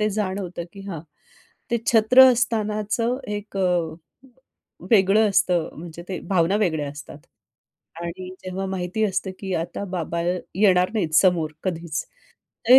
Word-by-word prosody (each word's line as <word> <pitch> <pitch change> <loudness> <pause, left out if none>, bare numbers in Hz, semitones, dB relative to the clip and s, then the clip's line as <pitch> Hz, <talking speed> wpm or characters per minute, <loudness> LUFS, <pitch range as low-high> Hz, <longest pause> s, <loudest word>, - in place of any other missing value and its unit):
ते 215 - +2
जाणवतं, 190 -4 -3
की 200 - -11
हां, 170 -5 -5 0.7
ते 235 - +2
छत्र 235 +3 +7
असतानाचं 225 +1 0 0.2
एक 205 -1 -8
अ, 175 -4 +1 1.0
वेगळं 210 0 +5
असतं 175 -4 +2
म्हणजे 170 0 -8
ते 185 - -3
भावना 185 +1 +2
वेगळ्या 160 -8 0
असतात 145 0 -10 0.8
आणि 180 +2 -6 0.2
जेव्हा 190 +1 -3
माहिती 190 +2 -2
असतं, 190 -1 -1
की 190 -2 -4
आता 165 +4 -3
बाबा 170 -3 -3 0.3
येणार 185 -2 +4
नाहीत 170 -7 -1
समोर 170 -4 +3
कधीच 165 -4 -3 0.6
ते 260 +1 +10
190 Hz, 130 wpm, -23 LUFS, 170-210 Hz, 1.0 s, ते